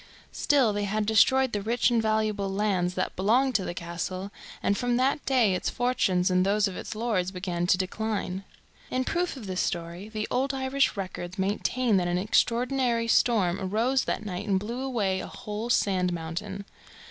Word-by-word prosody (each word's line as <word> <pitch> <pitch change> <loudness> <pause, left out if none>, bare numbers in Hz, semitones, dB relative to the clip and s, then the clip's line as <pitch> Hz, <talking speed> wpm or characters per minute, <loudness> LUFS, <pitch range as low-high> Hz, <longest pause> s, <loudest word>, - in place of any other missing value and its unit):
Still, 270 -8 +2
they 205 0 -1
had 210 +1 -1
destroyed 260 +4 +4
the 205 - -1
rich 235 +4 +1
and 235 -1 +3
valuable 215 -2 0
lands 195 -3 0
that 185 - -2
belonged 245 +8 +2
to 200 -4 +1
the 175 - -4
castle, 180 +3 -4 0.3
and 200 - +2
from 245 +2 0
that 270 +3 +1
day 245 -7 +3
its 185 - -1
fortunes 195 -7 +1
and 185 0 +3
those 200 +2 +2
of 190 - -6
its - - -6
lords 215 -5 0
began 180 -2 -3
to 185 - +4
decline. 195 0 -3 0.5
In 255 0 0
proof 345 +1 -1
of 235 - -8
this 185 -1 -2
story 170 +3 -4
the 215 -1 -3
old 270 +2 0
Irish 265 -2 +1
records 185 -2 -5
maintain 210 +4 +1
that 180 -1 +1
an 175 0 0
extraordinary 235 +4 +1
storm 205 -6 +3
arose 230 +8 +1
that - - -2
night 195 +1 -4
and 195 -2 +2
blew 235 +5 -5
away 215 -8 0
a - - -5
whole 210 +3 -6
sand 185 -6 +2
mountain. 175 +4 -5
210 Hz, 180 wpm, -27 LUFS, 185-240 Hz, 0.5 s, destroyed